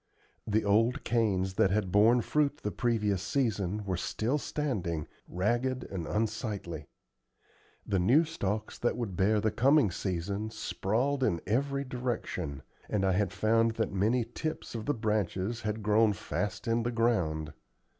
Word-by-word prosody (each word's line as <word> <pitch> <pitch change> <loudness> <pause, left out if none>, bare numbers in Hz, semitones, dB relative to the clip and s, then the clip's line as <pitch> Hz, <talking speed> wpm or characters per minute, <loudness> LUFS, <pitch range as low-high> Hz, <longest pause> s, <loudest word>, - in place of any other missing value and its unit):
The 110 0 +1
old 115 +7 +3
canes 100 -5 +1
that 100 0 +3
had 95 -1 0
borne 115 +5 +5
fruit 145 +4 0
the 105 - -1
previous 105 -6 0
season 105 -4 -1
were 95 -2 -1
still 115 +9 -1
standing, 95 - -2 0.2
ragged 120 +8 0
and 90 -5 -4
unsightly; 105 - -3 1.0
the 95 - +1
new 125 - +5
stalks 110 - -3
that 120 - 0
would 110 -7 -3
bear 105 +4 +3
the 110 +1 +1
coming 135 - +4
season 100 +4 -3
sprawled 125 +6 -1
in 85 -9 +2
every 140 +6 0
direction; 120 - -4 0.3
and 100 -2 +1
I 95 - +3
had 95 0 +1
found 115 +3 +2
that 110 -3 -1
many 110 +5 +2
tips 155 +7 -5
of 115 +1 -5
the 145 - +1
branches 110 0 -1
had 110 0 -3
grown 105 0 +4
fast 105 +4 -3
in 115 +1 +2
the 120 - -1
ground. 90 -11 0
110 Hz, 150 wpm, -30 LUFS, 95-120 Hz, 1.0 s, borne